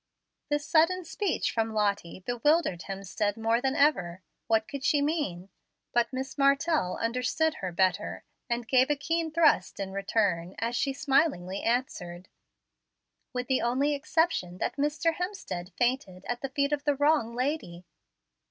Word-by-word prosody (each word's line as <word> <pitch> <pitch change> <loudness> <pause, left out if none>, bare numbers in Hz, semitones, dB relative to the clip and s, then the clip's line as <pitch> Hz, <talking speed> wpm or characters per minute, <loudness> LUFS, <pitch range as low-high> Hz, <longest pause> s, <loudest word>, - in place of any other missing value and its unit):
This 295 0 0
sudden 340 +3 +3
speech 345 +4 -1
from 225 -1 -1
Lottie 200 -4 -1
bewildered 245 - +1
Hemstead 195 +2 -2
more 225 +1 +1
than 265 0 0
ever. 185 - +2 0.2
What 220 -1 +2
could 280 -1 -6
she 290 - +3
mean? 285 - -1 0.4
But 240 +2 +2
Miss 265 +2 -5
Martell 275 - +2
understood 250 +7 0
her 185 -2 -3
better, 185 +2 0 0.3
and 235 -1 -2
gave 260 +2 +4
a 295 - +3
keen 325 +3 -1
thrust 315 -7 +3
in 195 -1 -3
return 195 -3 0
as 235 +1 -2
she 275 - +1
smilingly 270 - +1
answered, 185 -7 -2 1.0
"With 250 0 -3
the 260 0 +1
only 265 +5 +1
exception 290 - 0
that - - -2
Mr. 300 +4 +1
Hemstead 355 - -5
fainted 240 -7 -1
at 245 0 -3
the 270 - -3
feet 280 +2 0
of 290 -1 -1
the 290 -1 +2
wrong 290 -5 +2
lady." 250 - -3
250 Hz, 150 wpm, -28 LUFS, 200-295 Hz, 1.0 s, gave